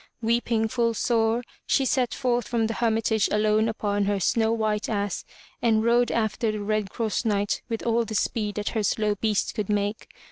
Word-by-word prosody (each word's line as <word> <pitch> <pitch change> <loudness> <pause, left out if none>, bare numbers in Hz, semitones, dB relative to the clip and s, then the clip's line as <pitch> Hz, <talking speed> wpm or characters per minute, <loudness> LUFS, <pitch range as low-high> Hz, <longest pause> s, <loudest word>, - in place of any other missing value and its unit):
Weeping 230 -1 +1
full 230 0 0
sore, 230 +1 +1 0.2
she 270 - +2
set 255 -2 +1
forth 245 -3 0
from 230 -2 0
the 225 - -1
Hermitage 225 -2 +1
alone 215 +1 +2
upon 205 -2 -1
her 200 0 0
snow 220 +4 +2
white 215 -2 -1
ass 205 -3 -2 0.4
and 220 -2 +3
rode 240 +1 +3
after 220 0 0
the 215 -1 -4
Red 215 -1 -1
Cross 220 +2 -2
Knight 205 -3 0
with 225 -1 -3
all 235 0 +2
the 220 -1 -6
speed 210 0 -1
that 210 0 -2
her 220 - -1
slow 210 +1 +1
beast 210 0 0
could 210 -2 -3
make. 205 +1 -1
220 Hz, 185 wpm, -25 LUFS, 210-230 Hz, 0.4 s, and